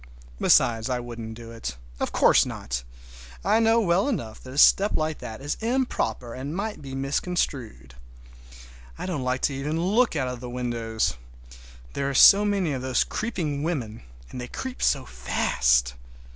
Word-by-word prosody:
Besides 115 0 +3
I 125 -1 0
wouldn't 115 -2 -7
do 115 0 -10
it. 115 - -6 0.2
Of - - -2
course - - +5
not. - - -4 0.6
I 225 - +4
know 225 0 +4
well 190 0 +2
enough 115 - -4
that 130 - -10
a - - -7
step 200 +7 +6
like 155 0 -2
that 110 +3 -8
is 145 +1 -3
improper 225 - -1
and 140 +5 -5
might 205 0 -4
be 135 -2 -7
misconstrued. 135 - -2 1.0
I - - -5
don't 175 -7 -3
like 130 +1 -1
to 140 +1 -1
look 195 +7 +2
out 135 -4 0
of 125 -1 -5
the 125 0 -7
windows 115 - -2 0.7
even—there 140 - -2
are 140 - -4
so 200 +9 +8
many 200 -6 0
of 130 - -3
those 130 -1 +1
creeping 165 -11 -3
women, 130 -9 -3 0.3
and 125 - -6
they 125 - -6
creep 260 - -6
so 135 -2 +2
fast. - - +1
135 Hz, 165 wpm, -25 LUFS, 115-180 Hz, 1.0 s, so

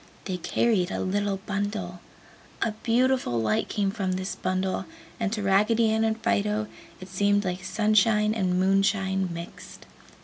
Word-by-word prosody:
They 185 -2 -2
carried 190 0 +1
a - - -3
little 195 0 -1
bundle. 200 -3 -3 0.6
A 230 - 0
beautiful 245 - +1
light 110 -1 0
came 200 -2 0
from 195 -3 -2
this 185 +1 -3
bundle, 185 0 -2 0.3
and 220 -4 -1
to 210 -2 -2
Raggedy 215 +4 +3
Ann 220 0 +1
and 220 0 +1
Fido 210 -1 0 0.3
it 185 - -9
seemed 205 +2 +1
like 180 0 -3
sunshine 215 +1 +2
and 185 -4 0
moonshine 190 0 +1
mixed. 170 0 -9
200 Hz, 145 wpm, -26 LUFS, 185-215 Hz, 0.6 s, Raggedy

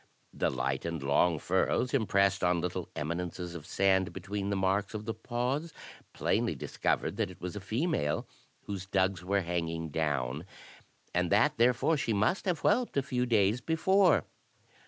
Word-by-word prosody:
The - - 0
light - - -2
and 85 -4 -4
long 80 +4 +3
furrows 95 - 0
impressed 100 -6 +2
on 90 -1 +3
little 90 - -3
eminences 85 +2 -4
of 80 -3 -8
sand 95 -1 +2
between 100 +2 -4
the 100 - 0
marks 95 +2 0
of 105 0 -5
the 115 - -2
paws 125 +8 -2 0.4
plainly - - 0
discovered - - -1
that - - 0
it 90 - -12
was 90 +1 -5
a - - -3
female, 110 - -1 0.4
whose 95 -2 -5
dugs 95 -2 +1
were 100 +2 +1
hanging 85 -2 -2
down, 75 -1 -1 0.7
and 90 0 +1
that 115 +9 +3
therefore 125 +7 +3
she 115 -5 0
must 105 - +1
have 180 -5 0
whelped 245 - +2
a 140 - +2
few 125 -1 -1
days 110 0 +3
before. 170 - +3
100 Hz, 160 wpm, -30 LUFS, 90-120 Hz, 0.7 s, long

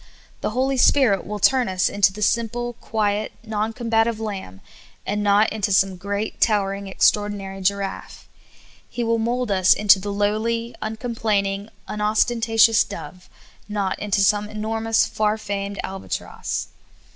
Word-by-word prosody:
The - - -2
Holy 265 +1 +1
Spirit 245 -8 +3
will 210 +1 -4
turn 250 +2 +3
us 185 -1 +1
into 200 -1 +3
the 210 +2 -5
simple, 235 +2 0
quiet, 210 -1 -1
non 220 0 -2
combative 225 -1 0
lamb, 195 - -6 0.4
and 210 +1 -1
not 205 +1 +3
into 210 -2 -1
some 190 0 +3
great, 200 +3 -4
towering 200 -2 +1
extraordinary 195 0 0
giraffe. 195 +1 -3 0.6
He 240 - -3
will 230 0 +1
mold 240 0 -1
us 185 -2 +4
into 205 -1 +5
the 205 +2 -4
lowly, 220 +3 -1
uncomplaining, 215 -3 -2 0.2
unostentatious 225 +1 +3
dove, 180 -1 -10 0.4
not 200 -2 -2
into 205 -1 0
some 205 +1 +2
enormous, 220 +1 0
far 215 -1 0
famed 200 -1 -4
albatross. 190 0 -5
210 Hz, 135 wpm, -22 LUFS, 200-225 Hz, 0.6 s, into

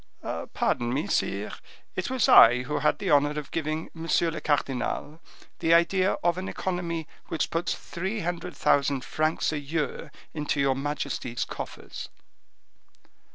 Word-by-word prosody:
"Pardon 120 0 +1
me, 140 +4 0
sire, 100 +2 -1 0.4
it 185 - -2
was 255 -4 +2
I 120 +2 +8
who 150 +4 -2
had 150 - +2
the - - -2
honor 145 +1 +4
of 150 -2 -5
giving 155 0 -2
monsieur 165 0 +1
le 160 - -5
cardinal 145 +2 -1 0.4
the 165 +1 +4
idea 185 +3 +3
of 175 +1 +2
an 190 - -4
economy 170 -3 -3 0.2
which 160 - -1
puts 165 +1 0
three 190 +5 -4
hundred 175 -1 -3
thousand 140 -2 +2
francs 155 +1 0
a 150 - -1
year 150 +2 -3 0.2
into 150 -2 -1
your 135 -1 +3
majesty's 140 -3 -3
coffers." - - -7
155 Hz, 145 wpm, -27 LUFS, 140-170 Hz, 0.4 s, I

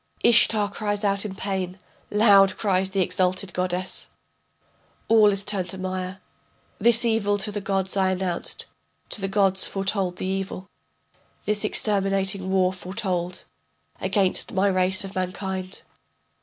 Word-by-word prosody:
Ishtar 215 -3 +4
cries 205 0 -3
out 200 0 0
in 195 -2 -5
pain, 190 -2 -3 0.3
loud 200 -2 +5
cries 190 -2 +1
the 195 0 0
exalted 185 +1 0
goddess: 180 0 -2 1.0
All 220 -2 +6
is 200 0 0
turned 190 -3 -2
to 190 - -4
mire. 185 0 -4 0.6
This 235 0 +6
evil 215 -3 +1
to 210 +1 -3
the 205 0 -4
gods 195 -1 -1
I 190 -1 +2
announced, 185 -2 -2 0.4
to 210 - -1
the 195 - -1
gods 195 -1 +1
foretold 195 -2 -1
the 185 - -5
evil. 190 0 -4 0.8
This 210 0 +1
exterminating 195 -2 +1
war 185 -1 +2
foretold 185 -2 -4 0.5
Against 195 -3 0
my 195 +1 +2
race 185 +1 +1
of 195 0 -8
mankind. 185 0 -4
195 Hz, 135 wpm, -24 LUFS, 185-205 Hz, 1.0 s, All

